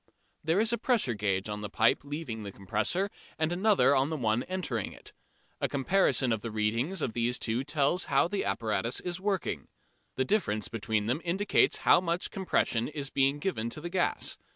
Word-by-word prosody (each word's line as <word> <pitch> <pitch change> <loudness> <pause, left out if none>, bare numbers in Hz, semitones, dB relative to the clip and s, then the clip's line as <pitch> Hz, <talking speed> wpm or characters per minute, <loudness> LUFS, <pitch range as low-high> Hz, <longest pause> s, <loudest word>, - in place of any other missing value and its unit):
There 165 +5 +2
is 225 +2 +2
a 235 - 0
pressure 230 - +1
gauge 100 -2 -1
on 105 0 -4
the 105 - -4
pipe 115 -1 +3
leaving 145 -6 -5
the 100 -1 -6
compressor 175 - -1 0.3
and 160 +2 0
another 190 -6 +4
on 135 +2 +2
the 160 - -2
one 115 -2 +1
entering 175 - -3
it. - - -11 0.5
A - - 0
comparison 140 -3 +2
of 110 -2 0
the 115 - -4
readings 115 - -1
on - - -1
these 120 +2 0
two 115 +3 -1
tells 145 +5 +1
how - - +3
the 200 +2 -2
apparatus 110 +3 0
is 180 0 -4
working. 195 -3 -2 0.5
The 130 - 0
difference 120 - 0
between 110 -1 -1
them 125 +8 0
indicates 190 +4 +2
how - - +6
much 170 0 -2
compression 125 -11 0
is 145 -2 -5
being 135 +1 +2
given 145 - -2
to 135 - -3
the 170 +2 -6
gas. 185 -1 0
140 Hz, 190 wpm, -29 LUFS, 110-180 Hz, 0.5 s, how